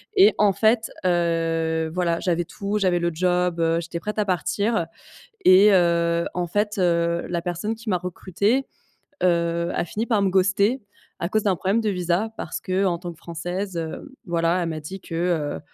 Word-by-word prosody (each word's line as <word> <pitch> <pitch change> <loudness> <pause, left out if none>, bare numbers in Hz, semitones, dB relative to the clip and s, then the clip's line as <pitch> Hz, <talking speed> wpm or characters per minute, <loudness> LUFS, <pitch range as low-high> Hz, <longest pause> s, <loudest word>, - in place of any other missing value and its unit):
Et 400 +2 +7
en 205 -1 +4
fait, 220 +2 +2 0.2
heu, 165 -2 +1
voilà, 170 -2 0
j'avais 175 -1 0
tout, 200 +4 -3
j'avais 180 -3 +2
le 170 0 0
job, 180 0 +1
heu, 165 0 +2
j'étais 170 0 -5
prête 210 +5 -4
à 210 - +2
partir 200 +1 0 0.6
et, 195 +3 +7
heu, 170 -2 +3
en 180 -1 -1
fait, 205 +3 -1
heu, 170 -1 +1
la 170 -1 -2
personne 180 +6 -3
qui 225 0 -10
m'a 180 - +2
recrutée, 195 +8 -1 0.6
heu, 170 -1 +1
a - - -1
fini 215 +6 -3
par 225 -4 +1
me 195 - +2
ghoster 195 +6 +2 0.4
à 170 - -2
cause 215 +2 +1
d'un 195 -3 +2
problème 195 +6 0
de 215 - 0
visa 180 +2 0
parce 165 - -5
qu'en 185 -1 0
tant 175 -1 -6
que 165 - -15
française, 175 +3 -5
heu, 165 - -6
voilà, 170 0 +1
elle 165 - -2
m'a 160 -1 -4
dit 190 +6 -8
que, 165 - -7
heu, 165 -3 -1
180 Hz, 185 wpm, -23 LUFS, 170-200 Hz, 0.6 s, Et